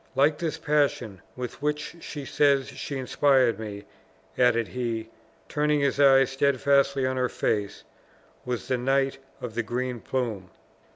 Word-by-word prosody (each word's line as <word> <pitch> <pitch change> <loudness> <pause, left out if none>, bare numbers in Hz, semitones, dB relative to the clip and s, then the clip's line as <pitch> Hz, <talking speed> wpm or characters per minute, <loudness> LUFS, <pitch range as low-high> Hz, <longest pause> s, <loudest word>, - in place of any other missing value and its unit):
Like 145 +2 +3
this 165 -2 -2
passion, 140 - 0
with 125 +1 -6
which 150 +3 -2
she 145 -3 -7
says 140 -3 +2
she 135 +1 -5
inspired 130 -3 +2
me," 105 -2 -6 0.5
added 115 -2 +2
he, 115 -3 -3 0.4
turning 150 0 +1
his 140 0 0
eyes 135 -1 +6
steadfastly 140 0 +2
on 130 0 -1
her 125 -1 +1
face, 100 -2 -2 0.6
"was 125 -2 -4
the 130 -2 0
Knight 135 +1 +1 0.2
of 120 -3 -5
the 120 - 0
Green 125 +2 -3
Plume! 110 -8 -3
130 Hz, 140 wpm, -26 LUFS, 120-140 Hz, 0.6 s, eyes